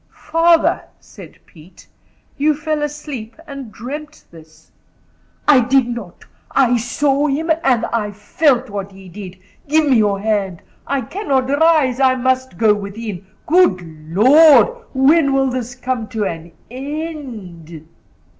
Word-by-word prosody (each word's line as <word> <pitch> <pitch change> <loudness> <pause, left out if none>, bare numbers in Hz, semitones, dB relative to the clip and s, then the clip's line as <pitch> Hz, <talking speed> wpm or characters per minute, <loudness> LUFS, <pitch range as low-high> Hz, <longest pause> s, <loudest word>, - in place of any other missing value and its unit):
"Father," 330 0 +3 0.2
said - - -14
Pete, 165 +1 -18 0.5
"you 300 +2 +1
fell 310 0 -3
asleep 290 -6 -6
and 275 -6 -9
dreamt 295 +8 -9
this." 160 -1 -18 0.8
"I 295 -3 +6
did 255 +1 +2
not. 235 -7 -8 0.2
I 250 -3 +2
saw 275 +5 0
him, 310 +4 -1
and 245 -4 +2
I 220 -3 -2
felt 250 +6 0
what 200 -2 -6
he 190 0 -14
did. 185 0 -10 0.3
Give 310 +1 +2
me 260 -4 +4
your 205 -2 +1
hand. 200 -4 -2 0.2
I 275 -1 -1
cannot 270 - -2
rise. 285 -3 +2
I 260 -1 +3
must 260 -5 -1
go 220 -1 +4
within. 200 -2 -7 0.2
Good 325 - +3 0.3
Lord, 260 - +6 0.2
when 280 +2 +3
will 270 -1 +1
this 245 -1 -5
come 250 -3 -3
to 215 -2 -3
an 165 -1 -6 0.2
end?" 245 - -8
255 Hz, 135 wpm, -18 LUFS, 210-290 Hz, 0.8 s, I